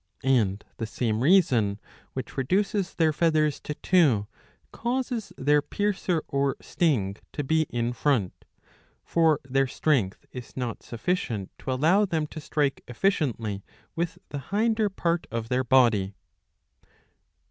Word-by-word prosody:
And 110 -7 +2
the 115 - -3
same 110 -1 -1
reason 130 - +4 0.3
which 130 -3 -6
reduces 190 +7 0
their 160 -2 +3
feathers 155 -2 +2
to 150 - -5
two 145 - +3 0.5
causes 240 -4 -2
their 145 +2 +3
piercer 190 -2 -1
or 140 0 0
sting 105 - 0 0.2
to 145 - -2
be 160 +2 +1
in 120 0 -1
front; 120 -9 +1 0.7
for 160 -3 +3
their 135 +1 +2
strength 125 -8 0
is 125 0 -9
not 125 -3 -3
sufficient 120 - -2
to - - -4
allow 165 +11 +4
them 160 -5 -1
to 155 - -6
strike 145 -2 -1
efficiently 115 - -1 0.3
with 170 0 -2
the 145 - -4
hinder 220 +1 +2
part 170 -3 -1
^* 115 - -2
of 115 0 -4
their 130 +1 +1
body. 115 -7 +3
140 Hz, 135 wpm, -26 LUFS, 120-170 Hz, 0.7 s, reason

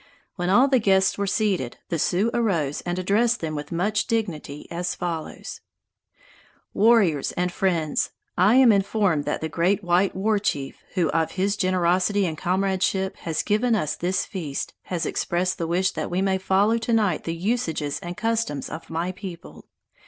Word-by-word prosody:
When 175 -1 -2
all 245 +8 +5
the 265 -2 +3
guests 195 -3 +3
were 200 - 0
seated, 190 - 0
the 165 - -1
Sioux 195 +9 +1
arose 170 -12 0
and 175 +1 -1
addressed 220 +6 +2
them 160 -2 -3
with 150 0 -6
much 205 +5 0
dignity 175 - -3
as 175 +1 -2
follows: 170 -3 -5 1.1
"Warriors 205 - +3
and 180 0 -1
friends: 170 -5 0 0.3
I 200 +6 +4
am 260 -3 +7
informed 200 -6 +1
that - - -2
the 160 - -1
great 180 +6 +1
white 180 +2 +2
war 210 +2 +1
chief 140 -9 -3
who 175 -5 +2
of 165 -1 0
his 195 +2 0
generosity 185 +1 +2
and 160 -3 -2
comradeship 190 +2 0
has 160 -2 -2
given 225 +3 +2
us 155 -8 -1
this 180 +2 -1
feast, 155 -8 -5
has 175 -3 -2
expressed 180 +2 -1
the 165 - -1
wish 180 +3 +1
that - - -4
we 180 - -1
may 190 -1 +1
follow 200 +4 +2
to 230 +1 -1
night 205 -8 +1
the 165 - -2
usages 165 -7 -1
and 175 0 -7
customs 225 -9 -1
of 160 - -8
my 170 +3 -2
people. 185 -3 -10
185 Hz, 170 wpm, -24 LUFS, 170-205 Hz, 1.1 s, am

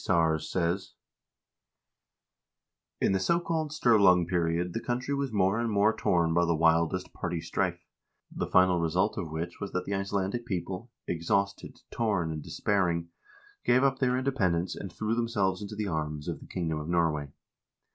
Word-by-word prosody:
Sars 80 -3 +1
says: 90 +2 -1 0.9
" - - -60
In - - +3
the 95 - +2
so 170 - +2
called 160 -3 -2
Sturlung 100 - +4
period 85 0 0
the - - -1
country 125 +4 -2
was 140 -2 -1
more 100 +1 +2
and 120 -1 0
more 105 +1 +3
torn 85 -2 +2
by 85 +1 +3
the 85 -1 +2
wildest 85 +3 +2
party 85 -1 -3
strife, - - -2 0.5
the - - -3
final 90 -1 +4
result 90 +5 +1
of 90 -6 -4
which 80 +2 -5
was 100 - -5
that 90 0 -1
the 100 - -3
Icelandic 100 +3 -1
people 95 +3 -4
— - - -57
exhausted, 100 +4 -1
torn, 100 -8 0
and 80 -1 -4
despairing 85 -3 0 0.3
— 410 0 -28
gave 130 +2 +5
up 135 -1 +2
their 125 -1 +2
independence 95 -10 0
and 95 - -7
threw 110 +6 -2
themselves 110 -5 0
into 105 +1 -6
the 105 0 -2
arms 75 -3 -3
of - - -3
the - - -13
kingdom 80 -4 -2
of 75 +2 -6
Norway. 80 -4 +1
95 Hz, 175 wpm, -29 LUFS, 85-110 Hz, 0.9 s, gave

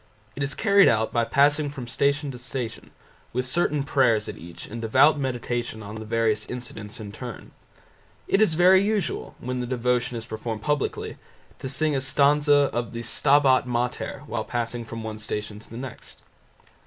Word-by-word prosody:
It 145 - -6
is 140 0 -1
carried 200 -2 +5
out 110 -1 +2
by 120 -1 +2
passing 145 +3 +3
from 135 -3 -7
Station 140 +3 0
to 125 - -9
Station, 125 -3 -5 0.4
with 125 +1 -1
certain 150 0 +1
prayers 125 -6 +2
at - - -5
each 85 0 -10
and 115 +2 -7
devout 135 +7 +4
meditation 120 -3 -3
on 100 +1 -8
the 110 0 -7
various 110 -1 0
incidents 115 -4 -7
in 105 -2 -7
turn. 120 +2 -8 0.8
It 195 - +3
is 175 -7 +4
very 185 +3 +6
usual, 205 -1 -1
when 125 +1 -4
the 125 - -3
devotion 125 -1 0
is 115 - -6
performed 110 0 -5
publicly, 150 -2 -1 0.4
to 130 - -4
sing 155 +2 +1
a 135 - 0
stanza 145 +1 +4
of 120 0 -2
the 115 0 -5
"Stabat 135 +1 +4
Mater" 125 0 -2
while - - -3
passing 120 0 -3
from 115 0 -7
one 110 -1 -5
Station 105 -1 -4
to 110 - -17
the 115 - -8
next. 130 -1 -9
125 Hz, 180 wpm, -25 LUFS, 115-145 Hz, 0.8 s, very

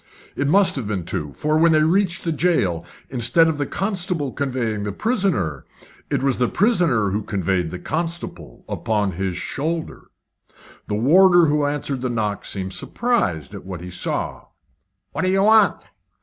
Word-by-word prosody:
It 140 - -1
must 190 +4 +4
have 120 -6 -3
been 95 -5 -3
two, 80 -5 -4
for 155 - 0
when 165 0 +5
they 155 0 +4
reached 175 +1 +1
the 165 - -1
jail, 145 - +1 0.3
instead 125 +6 +4
of 155 -2 -1
the 145 - -1
constable 180 -7 -2
conveying 125 -6 -2
the 100 0 -3
prisoner, 160 - -1 0.5
it - - -1
was 135 -2 +1
the 125 - +2
prisoner 170 - +2
who 105 +2 -1
conveyed 95 -4 -1
the 90 - -6
constable 170 - -5
upon 105 -3 -1
his 95 0 -3
shoulder. 160 +3 -4 0.8
The 105 - -2
warder 175 - +5
who 150 -1 +1
answered 145 -2 -3
the 130 - -1
knock 105 -4 -2
seemed 95 -1 -1
surprised 95 - -1
at - - -8
what 90 -2 -7
he 90 +1 -8
saw. 90 - -3 0.7
"What - - -3
do 185 - +1
you 195 +1 +2
want?" 215 -1 +4
140 Hz, 165 wpm, -21 LUFS, -, 0.8 s, when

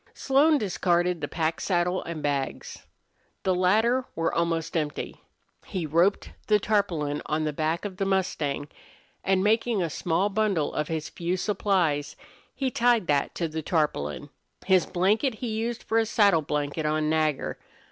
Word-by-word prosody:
Slone 290 +3 +4
discarded 180 - 0
the - - -2
pack 165 0 -1
saddle 180 0 0
and 165 -3 -5
bags. 140 -2 -3 0.6
The 190 - +2
latter 220 +8 +2
were 165 0 0
almost 165 -1 -1
empty. 150 -3 -3 0.5
He 185 -5 -3
roped 170 +6 +2 0.2
the 210 -1 +4
tarpaulin 175 -9 0
on 155 +1 0
the 150 -1 -1
back 160 +5 -1
of 190 -3 -5
the 195 - 0
mustang, 160 -7 -1 0.6
and, 190 -1 +2
making 220 -1 +2
a 165 - -2
small 175 +5 0
bundle 200 -7 0
of 150 - -1
his 160 -1 -3
few 175 +2 -2
supplies, 180 -8 0 0.4
he 265 -2 -1
tied 235 -4 +3
that 145 -3 0
to 170 - -1
the 160 0 -4
tarpaulin. 145 - -1 0.3
His 185 -2 +4
blanket 210 +8 +1
he 240 +2 -4
used 225 +2 -3
for 225 - +1
a 225 - +1
saddle 200 -7 +4
blanket 150 +1 -2
on 155 0 0
Nagger. 155 -2 0
175 Hz, 155 wpm, -26 LUFS, 155-210 Hz, 0.6 s, Slone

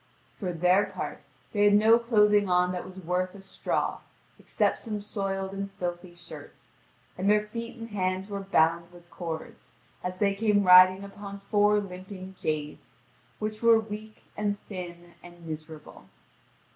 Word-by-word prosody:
For 185 -4 -2
their 180 +4 +3
part - - -6 0.3
they 205 -1 +3
had 205 0 +6
no 220 +3 +6
clothing 210 -4 +3
on 180 0 +3
that 180 -1 -4
was 185 0 -11
worth 180 +1 -2
a 200 - -11
straw, 195 - -2 0.4
except - - 0
some 215 -3 -4
soiled 195 -2 -3
and 195 0 -4
filthy 175 -1 -5
shirts: 170 -4 -12 0.5
and 195 +2 +1
their 210 0 +4
feet 230 +3 -7
and 230 -1 -8
hands 185 -1 -1
were 200 -1 -4
bound 170 -3 +2
with 175 -1 -17
cords, 165 -3 -7 0.3
as 180 0 -4
they 200 0 +2
came 205 0 +2
riding 185 +1 +8
upon 200 0 -8
four 205 +1 +3
limping 190 0 -8
jades, 150 -1 -4 0.4
which 215 0 -4
were 230 -1 +6
weak, 215 0 -8
and 205 -1 -1
thin, 175 -3 -8
and 175 -1 -14
miserable. 155 -1 -9
195 Hz, 155 wpm, -28 LUFS, 180-210 Hz, 0.5 s, riding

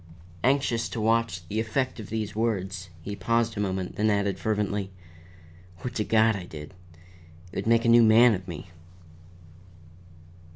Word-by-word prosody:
Anxious 130 -3 +1
to 115 - -5
watch 110 -5 0
the 105 +4 -2
effect 125 +3 -1
of 105 - -8
these 110 -1 -3
words, 95 -5 -2
he 100 +3 -5
paused 115 +4 0
a - - -4
moment, 95 -2 -2
then 110 +1 +2
added 100 -2 0
fervently: 105 -2 -1 0.9
"Would 125 - -4
to 110 - -1
God 110 0 +3
I 95 -3 -6
did! 75 0 -10 0.8
It - - -8
would - - -3
make 115 0 +3
a - - +2
new 120 0 +7
man 115 +1 +6
of 95 -2 -5
me." 85 +1 -8
110 Hz, 160 wpm, -26 LUFS, 95-115 Hz, 0.9 s, new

